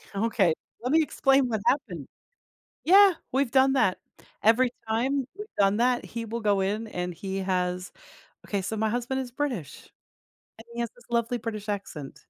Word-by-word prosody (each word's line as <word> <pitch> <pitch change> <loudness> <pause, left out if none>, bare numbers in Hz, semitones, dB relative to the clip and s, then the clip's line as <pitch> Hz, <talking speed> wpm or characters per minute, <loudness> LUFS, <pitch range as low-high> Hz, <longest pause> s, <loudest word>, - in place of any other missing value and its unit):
Okay. 200 -5 +2 0.3
Let 250 - -2
me 320 +1 +5
explain 270 -3 +3
what 220 -3 -1
happened. 180 - 0 0.8
Yeah, 390 +2 +7 0.2
we've 265 -1 +1
done 270 0 +4
that. 220 -9 +2 0.5
Every 230 +4 +5 0.2
time 260 +5 0
we've 420 - -6
done 200 +1 +4
that, 245 +1 +2
he 230 -1 -5
will 230 +1 -4
go 205 -2 +2
in 210 +4 -1
and 180 -3 -4
he 195 +2 -5
has 180 -1 -1 0.6
Okay, 200 -2 -1
so 220 - -3
my 220 +1 +1
husband 245 +3 -1
is 255 - -5
British, 245 - -4 0.7
and 225 - -12
he 235 - -4
has 235 -2 -2
this 245 - -20
lovely 235 +1 0
British 215 -2 -6
accent. 165 -8 -5
230 Hz, 170 wpm, -27 LUFS, 195-255 Hz, 0.8 s, Yeah